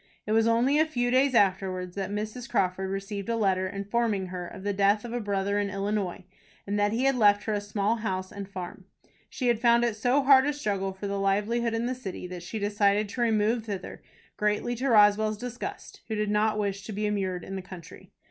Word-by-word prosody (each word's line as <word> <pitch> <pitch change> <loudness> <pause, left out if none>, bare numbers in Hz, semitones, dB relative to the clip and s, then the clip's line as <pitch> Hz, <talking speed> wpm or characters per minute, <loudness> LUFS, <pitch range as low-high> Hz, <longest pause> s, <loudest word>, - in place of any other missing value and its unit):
It 210 - -3
was 225 +1 +4
only 245 +6 +3
a 315 - +5
few 245 -5 -1
days 260 0 +3
afterwards 185 -3 +1
that 195 -1 -3
Mrs. 215 +4 -5
Crawford 190 +1 0
received 195 +2 -4
a 230 - +1
letter, 190 -4 +1
informing 200 0 -1
her 180 -1 -5
of 190 +1 -10
the 205 0 -1
death 200 +3 +2
of 235 - -6
a 245 - -1
brother 200 -1 -1
in 205 -1 -1
Illinois, 200 -1 -2 0.4
and 205 +1 -1
that 205 0 +2
he 235 +4 0
had 270 0 +3
left 205 -3 +4
her 220 - -1
a 205 - -1
small 205 +2 0
house 185 -4 -3
and 200 -1 -7
farm. 185 0 -7 0.4
She 255 - -3
had 235 -2 +2
found 235 -1 +5
it 235 -3 +1
so 250 +6 +2
hard 265 0 +6
a 295 - +1
struggle 200 -8 -2
for 190 +2 -8
a 200 0 -2
livelihood 210 +4 0
in 225 +1 -1
the 250 - -1
city, 235 -8 -7
that 180 -1 -7
she 180 +6 -6
decided 205 0 +1
to 240 - -4
remove 225 0 +2
thither, 200 -4 -6 0.4
greatly 210 +3 0
to 265 +3 -1
Roswell's 215 -1 +5
disgust, 250 - -7
who 220 - -3
did 210 -1 -1
not 215 +1 +2
wish 200 -1 -2
to - - -6
be 210 +2 -2
immured 190 -3 -1
in 195 - -6
the 190 - -4
country. 180 -3 -12
210 Hz, 225 wpm, -27 LUFS, 195-230 Hz, 0.4 s, hard